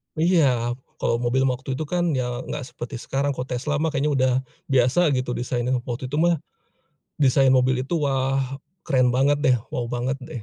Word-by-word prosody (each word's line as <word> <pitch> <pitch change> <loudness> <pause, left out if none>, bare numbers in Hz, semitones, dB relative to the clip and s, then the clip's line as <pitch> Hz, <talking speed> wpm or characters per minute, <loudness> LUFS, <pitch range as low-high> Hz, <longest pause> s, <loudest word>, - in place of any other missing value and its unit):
Iya. 145 -8 +2 0.3
Kalau 115 - 0
mobil 125 +2 +1
waktu 130 0 -2
itu, 155 - -2
kan, 175 +2 0
ya, 125 -1 -2
enggak 150 -2 -4
seperti 120 +2 -6
sekarang. 135 +4 -2
Kalau 125 - -4
Tesla, 135 +4 -2
mah, 155 +1 -1
kayaknya 145 +2 +1
udah 130 -1 +3 0.4
biasa, 135 +6 +3
gitu, 125 -1 -1
desainnya. 125 +1 -1
Waktu 125 +1 -4
itu, 145 - -2
mah, 170 0 +3 0.8
desain 135 -1 +4
mobil 130 0 +3
itu, 170 - -1
wah, 135 -2 0 0.3
keren 130 -5 +3
banget, 135 +4 +2
deh, 130 -4 +4 0.2
wow 120 -1 -2
banget, 125 +2 -2
deh. 125 -3 -7
130 Hz, 180 wpm, -23 LUFS, 125-145 Hz, 0.8 s, desain